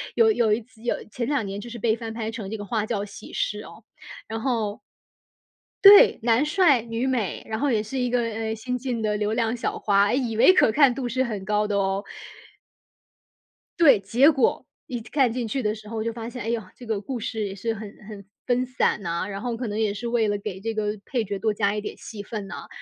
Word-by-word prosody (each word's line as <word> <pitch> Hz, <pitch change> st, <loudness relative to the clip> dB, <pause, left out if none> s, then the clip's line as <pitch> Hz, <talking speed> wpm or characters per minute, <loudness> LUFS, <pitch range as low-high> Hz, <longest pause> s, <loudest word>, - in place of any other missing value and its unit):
有 450 Hz, -1 st, +5 dB
有 225 Hz, -, +2 dB
一 225 Hz, -, 0 dB
集 225 Hz, 0 st, -20 dB
有 -, -, +1 dB, 0.2 s
前 235 Hz, +2 st, -3 dB
两 280 Hz, -5 st, 0 dB
年 195 Hz, +1 st, -5 dB
就 235 Hz, +4 st, -8 dB
是 235 Hz, -, -7 dB
被 225 Hz, 0 st, +1 dB
翻 225 Hz, 0 st, -5 dB
拍 225 Hz, -1 st, -4 dB
成 220 Hz, -4 st, -6 dB
这 220 Hz, -, -4 dB
个 205 Hz, -, -6 dB
《花 215 Hz, 0 st, -1 dB
轿 215 Hz, -3 st, -2 dB
喜 205 Hz, -1 st, -11 dB
事》 -, -, -2 dB
哦。 -, -, -15 dB, 0.4 s
然 225 Hz, 0 st, -4 dB
后 220 Hz, -4 st, -1 dB, 1.1 s
对， 410 Hz, +4 st, +9 dB
男 235 Hz, +4 st, +3 dB
帅 300 Hz, -6 st, +4 dB
女 230 Hz, +2 st, -3 dB
美， 245 Hz, -8 st, -1 dB
然 220 Hz, 0 st, -4 dB
后 290 Hz, -, +1 dB
也 220 Hz, -4 st, +1 dB
是 260 Hz, +5 st, -4 dB
一 250 Hz, -1 st, 0 dB
个， 245 Hz, 0 st, +1 dB
呃， 225 Hz, -1 st, -3 dB
新 250 Hz, +3 st, -3 dB
进 245 Hz, -2 st, -3 dB
的 210 Hz, -1 st, 0 dB
流 210 Hz, +1 st, -1 dB
量 230 Hz, 0 st, 0 dB
小 -, -, -2 dB
花， 200 Hz, -1 st, +3 dB
哎， 205 Hz, -, 0 dB
以 245 Hz, -4 st, -1 dB
为 370 Hz, -, +7 dB
可 300 Hz, -, +4 dB
看 270 Hz, 0 st, +5 dB
度 255 Hz, -3 st, -3 dB
是 255 Hz, +3 st, 0 dB
很 210 Hz, -5 st, -4 dB
高 210 Hz, +1 st, +1 dB
的 205 Hz, -, -1 dB
哦。 195 Hz, 0 st, 0 dB, 1.8 s
对， 280 Hz, -10 st, +7 dB
结 240 Hz, +10 st, +4 dB
果 270 Hz, -4 st, +1 dB, 0.2 s
一 245 Hz, -5 st, -5 dB
看 255 Hz, +1 st, +1 dB
进 245 Hz, -2 st, -2 dB
去 260 Hz, +4 st, -2 dB
的 210 Hz, 0 st, +1 dB
时 215 Hz, -1 st, -11 dB
候， 220 Hz, -1 st, -3 dB
就 230 Hz, 0 st, -2 dB
发 230 Hz, 0 st, -6 dB
现， 250 Hz, -1 st, -7 dB
哎 225 Hz, -, -3 dB
哟， 235 Hz, -1 st, 0 dB
这 245 Hz, -, -12 dB
个 220 Hz, -3 st, -2 dB
故 250 Hz, +3 st, -5 dB
事 220 Hz, 0 st, -3 dB
也 195 Hz, -1 st, -5 dB
是 225 Hz, +4 st, -2 dB
很 215 Hz, -1 st, -8 dB, 0.2 s
很 210 Hz, -2 st, -9 dB, 0.2 s
分 250 Hz, 0 st, +1 dB
散 255 Hz, -4 st, 0 dB
呐， 170 Hz, -2 st, -2 dB
然 200 Hz, -1 st, -5 dB
后 235 Hz, -1 st, -3 dB
可 245 Hz, 0 st, -3 dB
能 210 Hz, +1 st, -3 dB
也 215 Hz, -2 st, +1 dB
是 225 Hz, +4 st, -5 dB
为 235 Hz, -2 st, +1 dB
了 205 Hz, 0 st, 0 dB
给 200 Hz, -2 st, -6 dB
这 225 Hz, +2 st, -2 dB
个 210 Hz, -1 st, -1 dB
配 245 Hz, -4 st, -1 dB
角 200 Hz, -1 st, -4 dB
多 220 Hz, 0 st, +1 dB
加 200 Hz, -1 st, +1 dB
一 210 Hz, -, -2 dB
点 205 Hz, -, -7 dB
戏 215 Hz, -2 st, -8 dB
份 205 Hz, -1 st, -6 dB
呐， -, -, -7 dB
然 -, -, -9 dB
225 Hz, 265 characters per minute, -25 LUFS, 210-245 Hz, 1.8 s, 对